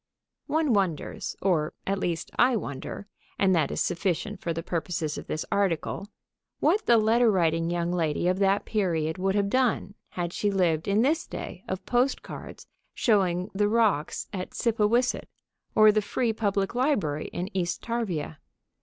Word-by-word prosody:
One 305 -3 +2
wonders 190 -7 -1
(or, 165 -6 +1
at 195 0 0
least, 170 -3 -2
I 250 0 +4
wonder, 140 -1 -5 0.3
and 190 -1 +3
that 160 -5 +2
is - - -2
sufficient 190 +3 -1
for 170 - -2
the 165 0 -3
purposes 165 -3 -2
of - - -7
this 155 - -3
article) 200 -1 0 0.5
what 430 +1 +2
the 235 - +6
letter 225 +2 +4
writing 165 -4 +2
young 175 0 -1
lady 170 -1 0
of 185 +1 +1
that 195 0 +2
period 165 -5 0
would 190 +1 +1
have 200 -1 +2
done 250 -6 +1 0.2
had 175 -1 -4
she 205 - 0
lived 175 -5 +1
in 205 +3 +3
this 315 +5 +1
day 180 - -7
of 190 0 -4
postcards 250 +2 -2 0.3
showing 190 -4 +2
the 205 +1 +2
rocks 215 -9 +1
at 185 -2 -5
Scipawisset 230 +2 +1 0.5
or 215 0 +8
the 215 0 +2
Free 225 +3 -1
Public 200 -2 0
Library 220 - 0
in 185 +3 -5
East 175 -2 -1
Tarvia. 190 -11 -3
195 Hz, 160 wpm, -27 LUFS, 170-220 Hz, 0.5 s, or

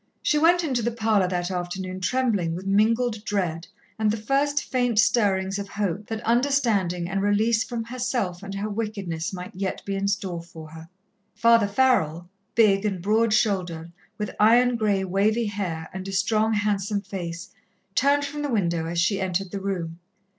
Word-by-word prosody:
She 300 - +2
went 345 +3 +4
into 260 -6 0
the 235 - 0
parlour 220 -4 +1
that 180 0 -2
afternoon 185 +1 -4
trembling 200 -6 0
with 185 +2 -7
mingled 215 +3 +2
dread, 175 -6 -2 0.3
and 215 -1 +2
the 215 - 0
first 280 +6 0
faint 245 -3 0
stirrings 195 -3 +2
of 200 0 -6
hope 200 -1 -3
that 220 -1 -5
understanding 230 -9 +1
and 195 +1 -1
release 215 +3 +2
from 235 -2 -4
herself 235 -6 -2
and 195 0 -7
her 200 +2 -2
wickedness 200 -6 -3
might 180 +2 -7
yet 190 0 -4
be 200 - -3
in 195 0 -1
store 190 -4 -2
for 160 -2 -12
her. 160 +1 -12 0.5
Father 230 -2 +4
Farrell, 200 -8 +1 0.3
big 205 -3 +4
and 200 -4 -1
broad 215 +5 +2
shouldered, 180 -7 0 0.3
with 210 -1 -4
iron 240 +3 +5
grey, 205 -4 +1
wavy 205 +5 +1
hair 185 -6 -3
and 190 +1 -6
a - - -4
strong, 215 +3 +1
handsome 205 -1 0
face, 175 -3 -6 0.4
turned 285 +1 +3
from 295 +1 -5
the 290 - -2
window 170 -8 0
as 170 +1 -2
she 190 +3 +1
entered 190 0 -2
the 200 - -4
room. 175 -4 -4
200 Hz, 175 wpm, -25 LUFS, 185-230 Hz, 0.5 s, iron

